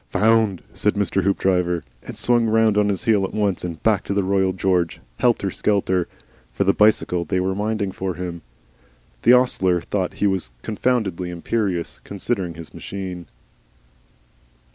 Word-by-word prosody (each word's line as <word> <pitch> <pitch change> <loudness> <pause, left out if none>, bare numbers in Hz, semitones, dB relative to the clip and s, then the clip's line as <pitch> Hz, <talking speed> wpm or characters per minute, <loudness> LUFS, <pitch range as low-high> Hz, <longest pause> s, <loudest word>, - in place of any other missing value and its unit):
"Found!" 110 -4 +2
said 105 - 0
Mr. 100 -1 +1
Hoopdriver 90 -3 +1 0.2
and - - -9
swung 120 -1 +2
round 110 -1 +3
on 105 0 +3
his 100 - -2
heel 110 -5 +3
at 95 - -4
once, 100 -3 0
and 85 -3 -6
back 110 -4 +2
to 100 - -2
the 100 - +2
Royal 95 0 +2
George, 90 -2 0 0.2
helter - - +2
skelter, 95 -4 0 0.4
for - - 0
the 100 0 +3
bicycle 105 -4 +3
they 90 +3 -1
were 95 +1 0
minding 105 0 -1
for 95 -1 -4
him. 85 -1 -5 0.8
The 120 - +6
ostler 95 -8 +3
thought 95 +1 -3
he - - -1
was 95 -11 0
confoundedly 105 -6 -1
imperious, 90 0 -2
considering 95 -4 -3
his 85 -1 -10
machine. 90 -3 -6
95 Hz, 155 wpm, -22 LUFS, 90-105 Hz, 0.8 s, The